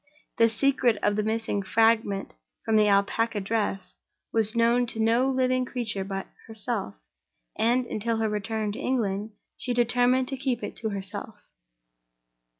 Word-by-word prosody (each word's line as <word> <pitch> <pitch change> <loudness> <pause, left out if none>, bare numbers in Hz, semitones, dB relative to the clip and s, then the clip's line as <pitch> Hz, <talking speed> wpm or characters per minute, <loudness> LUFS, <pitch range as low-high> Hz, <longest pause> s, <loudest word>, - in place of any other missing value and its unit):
The 230 0 +5
secret 245 -1 +2
of 205 0 +2
the 215 - +1
missing 220 -1 -1
fragment 220 -1 +1 0.3
of 220 - +2
the 210 -1 +5
Alpaca 205 +2 +2
dress 200 -2 -2 0.4
was 220 0 +2
known 235 +1 +3
to 225 - -6
no 230 +4 +3
living 255 -1 +1
creature 230 -6 -3
but 195 0 -4 0.2
herself; 220 - -3 0.6
and, 240 +3 +2
until 230 0 -2
her 220 0 +1
return 210 0 -2
to 215 - -7
England, 220 -6 -1 0.2
she 245 -1 -3
determined 245 +2 +3
to 270 - -4
keep 260 -2 -2
it - - -5
to 220 - -3
herself. 200 +1 -6
225 Hz, 150 wpm, -26 LUFS, 205-245 Hz, 0.6 s, The